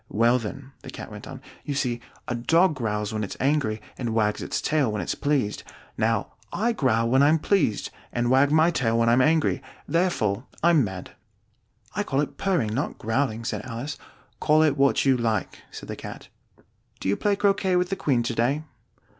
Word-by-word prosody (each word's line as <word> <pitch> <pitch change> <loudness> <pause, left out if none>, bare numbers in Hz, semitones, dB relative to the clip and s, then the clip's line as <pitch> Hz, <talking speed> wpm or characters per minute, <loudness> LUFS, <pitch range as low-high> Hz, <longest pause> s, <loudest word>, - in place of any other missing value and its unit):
"Well 120 +3 +3
then," 130 +5 -7
the - - -10
Cat - - -8
went - - -9
on, - - -9 0.2
"you 145 - -3
see 120 -4 -1 0.3
a - - -1
dog 165 +9 +3
growls 105 -5 -2
when 110 0 -2
it's 100 - -5
angry, 135 -6 +1 0.2
and 120 -3 -2
wags 105 -2 +1
its - - -2
tail 150 -7 +1
when 105 - -2
it's - - -2
pleased. 140 -8 0 0.3
Now - - 0 0.2
I 235 +3 +1
growl 115 - +1
when 130 +3 +4
I'm 150 +3 +5
pleased, 160 - +1 0.2
and 120 +1 0
wag 135 +2 +4
my 160 +2 +5
tail 115 -8 +1
when 115 0 +3
I'm 120 +2 +5
angry. 155 +3 +2 0.3
Therefore 140 - 0 0.2
I'm 170 -4 +5
mad." 95 -4 -6 0.8
"I - - 0
call 135 - -1
it 145 - -2
purring, 165 - +1
not 130 +6 -2
growling," 115 0 -1
said - - -3
Alice. 130 +4 -5 0.4
"Call 155 0 +4
it 150 -3 +3
what 140 0 +3
you 135 -1 +5
like," 115 -4 -1
said - - -9
the - - -5
Cat. - - -9 0.7
"Do - - -4
you 100 - +2
play 205 - +1
croquet 195 -2 +2
with 180 0 +1
the - - +1
Queen 130 -9 +1
to 120 - -2
day?" 130 +7 +1
130 Hz, 195 wpm, -25 LUFS, 115-155 Hz, 0.8 s, I'm